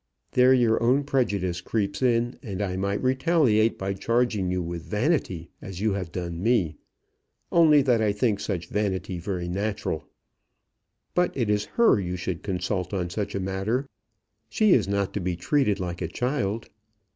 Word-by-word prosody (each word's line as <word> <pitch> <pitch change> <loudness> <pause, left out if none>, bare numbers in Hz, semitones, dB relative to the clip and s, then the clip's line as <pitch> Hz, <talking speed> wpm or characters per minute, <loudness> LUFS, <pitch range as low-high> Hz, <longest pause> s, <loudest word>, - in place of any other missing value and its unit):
"There 125 +1 +5
your 120 -4 +3
own 130 +5 +3
prejudice 100 -11 0
creeps 100 -1 -2
in, 120 -1 +1
and 100 -5 -6
I 95 -3 -1
might 100 +3 -1
retaliate 130 -4 +3
by 95 0 -2
charging 110 -1 0
you 90 0 0
with 85 -1 -4
vanity 105 - -1
as 95 -2 -7
you 105 0 +1
have 95 -4 -4
done 85 -2 -4
me, 95 -9 +1 0.7
only 155 -4 +6
that 120 -4 +3
I 105 -2 +2
think 105 0 0
such 90 -4 -4
vanity 95 -3 -2
very 90 -1 -3
natural. 100 -3 -2 1.1
But 180 -4 +1
it 115 -5 +1
is 105 0 +1
her 235 - +5
you 90 -1 -3
should 90 -1 -4
consult 95 0 -2
on 90 -2 -2
such 105 0 -3
a - - -1
matter. 95 +8 -1 0.6
She 215 -4 +4
is - - +3
not 100 -1 -1
to - - -2
be 90 -1 -2
treated 105 - +1
like 90 -1 -4
a 80 - -1
child. 115 - -2
100 Hz, 170 wpm, -26 LUFS, 90-120 Hz, 1.1 s, only